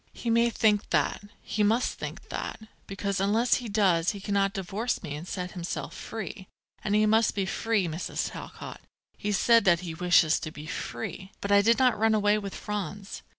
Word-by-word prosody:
"He 235 Hz, -, -3 dB
may 235 Hz, +1 st, +4 dB
think 210 Hz, -3 st, +2 dB
that; -, -, +1 dB, 0.2 s
he 215 Hz, -, -2 dB
must 225 Hz, +4 st, +2 dB
think -, -, -7 dB
that; -, -, -4 dB, 0.3 s
because 200 Hz, 0 st, -2 dB
unless 220 Hz, +5 st, +3 dB
he 235 Hz, -, -6 dB
does 190 Hz, -5 st, +2 dB
he 200 Hz, -, -7 dB
cannot 200 Hz, 0 st, +1 dB
divorce 200 Hz, +5 st, -2 dB
me 145 Hz, -4 st, -5 dB
and 160 Hz, +4 st, -8 dB
set 180 Hz, -1 st, -4 dB
himself 175 Hz, -1 st, -5 dB
free, 190 Hz, -3 st, -7 dB, 0.4 s
and 210 Hz, -1 st, +1 dB
he 215 Hz, 0 st, +4 dB
must 220 Hz, +1 st, +3 dB
be 195 Hz, -2 st, 0 dB
free, 210 Hz, 0 st, 0 dB
Mrs. 160 Hz, +2 st, -3 dB
Talcott; -, -, -9 dB, 0.3 s
he 210 Hz, -, -6 dB
has 205 Hz, -, +2 dB
said 230 Hz, +2 st, +5 dB
that 175 Hz, -2 st, +4 dB
he 170 Hz, -3 st, -5 dB
wishes 170 Hz, -1 st, +4 dB
to 155 Hz, -, -5 dB
be 150 Hz, -1 st, -10 dB
free. 170 Hz, +5 st, -5 dB
But 200 Hz, -, -3 dB
I 200 Hz, 0 st, +7 dB
did 230 Hz, +3 st, +4 dB
not 250 Hz, -4 st, +3 dB
run 220 Hz, 0 st, +4 dB
away 210 Hz, 0 st, +3 dB
with 200 Hz, -2 st, -6 dB
Franz. 205 Hz, -1 st, -5 dB
200 Hz, 195 wpm, -28 LUFS, 180-220 Hz, 0.4 s, I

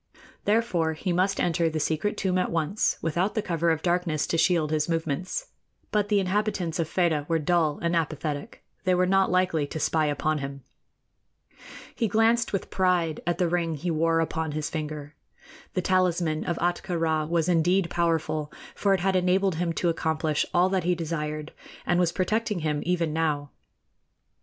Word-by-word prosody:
Therefore, 200 Hz, -7 st, +1 dB
he 175 Hz, +3 st, -2 dB
must 190 Hz, +3 st, +1 dB
enter 165 Hz, -1 st, +1 dB
the 155 Hz, 0 st, -2 dB
secret 160 Hz, +7 st, -1 dB
tomb 185 Hz, -1 st, +1 dB
at -, -, 0 dB
once, 170 Hz, +5 st, 0 dB
without 175 Hz, +5 st, 0 dB
the 215 Hz, -, +1 dB
cover 170 Hz, -1 st, 0 dB
of 160 Hz, -1 st, 0 dB
darkness 175 Hz, -4 st, +1 dB
to -, -, -2 dB
shield 165 Hz, -4 st, +2 dB
his 155 Hz, +1 st, 0 dB
movements; 165 Hz, -, -2 dB, 0.4 s
but 205 Hz, -1 st, +1 dB
the 205 Hz, -2 st, +3 dB
inhabitants 190 Hz, -3 st, -1 dB
of 160 Hz, -2 st, -1 dB
Fedah 160 Hz, -5 st, +1 dB
were 165 Hz, -, +3 dB
dull 160 Hz, -1 st, +1 dB
and 170 Hz, 0 st, +1 dB
apathetic 155 Hz, -2 st, -3 dB, 0.2 s
they 185 Hz, -1 st, +3 dB
were 180 Hz, +1 st, +3 dB
not 195 Hz, +1 st, +3 dB
likely 180 Hz, -5 st, +1 dB
to 160 Hz, -, -5 dB
spy 155 Hz, +1 st, +1 dB
upon 150 Hz, +1 st, 0 dB
him. 140 Hz, -1 st, -6 dB, 1.3 s
He 230 Hz, -, 0 dB
glanced 225 Hz, +2 st, +2 dB
with 195 Hz, -, -3 dB
pride 180 Hz, -4 st, +1 dB
at 175 Hz, -, +1 dB
the 180 Hz, -, +2 dB
ring 165 Hz, -1 st, 0 dB
he 170 Hz, +4 st, -3 dB
wore 165 Hz, +1 st, +2 dB
upon 160 Hz, -1 st, -2 dB
his 150 Hz, 0 st, -3 dB
finger. 150 Hz, -2 st, -5 dB, 0.6 s
The 185 Hz, -, 0 dB
talisman 175 Hz, -4 st, +1 dB
of 170 Hz, -, -1 dB
Ahtka 175 Hz, 0 st, -1 dB
Rā 160 Hz, -1 st, 0 dB
was 170 Hz, -1 st, +1 dB
indeed 175 Hz, +1 st, +2 dB
powerful, 160 Hz, -3 st, 0 dB, 0.2 s
for 200 Hz, -1 st, +2 dB
it 185 Hz, -, -3 dB
had 190 Hz, +1 st, +1 dB
enabled 185 Hz, +1 st, +2 dB
him 170 Hz, 0 st, 0 dB
to 175 Hz, -, 0 dB
accomplish 160 Hz, -2 st, 0 dB
all 180 Hz, +1 st, +4 dB
that 190 Hz, -1 st, 0 dB
he 180 Hz, +1 st, +2 dB
desired, 155 Hz, -2 st, -4 dB, 0.3 s
and 175 Hz, -, +2 dB
was 175 Hz, -2 st, +2 dB
protecting 210 Hz, +1 st, -1 dB
him 150 Hz, -1 st, -1 dB
even 170 Hz, -3 st, 0 dB
now. 150 Hz, -3 st, -1 dB
170 Hz, 175 wpm, -26 LUFS, 155-185 Hz, 1.3 s, all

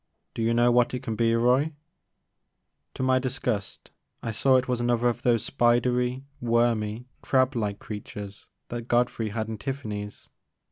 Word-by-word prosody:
Do -, -, -4 dB
you 115 Hz, +1 st, +2 dB
know 120 Hz, +1 st, +4 dB
what 120 Hz, +1 st, +3 dB
it 125 Hz, -, -5 dB
can 115 Hz, -4 st, -3 dB
be, 115 Hz, +1 st, +2 dB
Roy? 125 Hz, +6 st, +3 dB, 1.2 s
To -, -, -3 dB
my 130 Hz, 0 st, +3 dB
disgust 125 Hz, -5 st, -3 dB, 0.3 s
I 115 Hz, -, -2 dB
saw 130 Hz, +5 st, +3 dB
it 130 Hz, 0 st, +2 dB
was 125 Hz, -2 st, 0 dB
another 120 Hz, 0 st, +2 dB
of 120 Hz, -, -3 dB
those 120 Hz, -4 st, +2 dB
spidery 125 Hz, +1 st, +1 dB
wormy 115 Hz, -1 st, +1 dB, 0.2 s
crablike 125 Hz, -6 st, +1 dB
creatures 105 Hz, -1 st, -8 dB, 0.2 s
that 120 Hz, -1 st, -5 dB
Godfrey 120 Hz, -2 st, +1 dB
had 110 Hz, +1 st, -3 dB
in 110 Hz, -2 st, -5 dB
TiflFany*s. 105 Hz, -7 st, -5 dB
120 Hz, 150 wpm, -26 LUFS, 110-125 Hz, 1.2 s, know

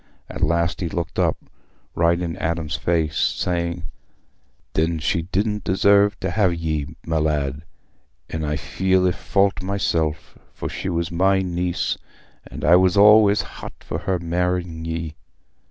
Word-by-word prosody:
At -, -, -8 dB
last 85 Hz, +4 st, +1 dB
he 85 Hz, -, -1 dB
looked 85 Hz, +1 st, -4 dB
up, -, -, +2 dB, 0.6 s
right 85 Hz, +1 st, +2 dB
in 85 Hz, -2 st, -3 dB
Adam's 80 Hz, -1 st, -2 dB
face, 80 Hz, -3 st, 0 dB
saying, 85 Hz, -1 st, -1 dB, 0.9 s
"Then 80 Hz, +1 st, +1 dB
she 80 Hz, +1 st, 0 dB
didna 105 Hz, +2 st, 0 dB
deserve 100 Hz, +3 st, +3 dB
t' -, -, -2 dB
ha' 105 Hz, -3 st, +2 dB
ye, 80 Hz, -3 st, -3 dB
my 80 Hz, -1 st, 0 dB
lad. 75 Hz, -2 st, -1 dB, 0.7 s
An' 80 Hz, 0 st, -4 dB
I 75 Hz, 0 st, -1 dB
feel 95 Hz, +6 st, +1 dB
i' -, -, +3 dB
fault 100 Hz, +2 st, +1 dB
myself, 85 Hz, -5 st, -2 dB, 0.2 s
for -, -, -4 dB
she -, -, -4 dB
was 85 Hz, -1 st, -2 dB
my 95 Hz, +2 st, +2 dB
niece, 90 Hz, -1 st, -1 dB, 0.5 s
and -, -, -6 dB
I 85 Hz, +3 st, +7 dB
was 95 Hz, +1 st, +3 dB
allays 105 Hz, 0 st, +6 dB
hot -, -, -9 dB
for -, -, -4 dB
her 95 Hz, -1 st, -1 dB
marr'ing 85 Hz, -1 st, -2 dB
ye. 80 Hz, -1 st, -4 dB
85 Hz, 150 wpm, -22 LUFS, 80-95 Hz, 0.9 s, I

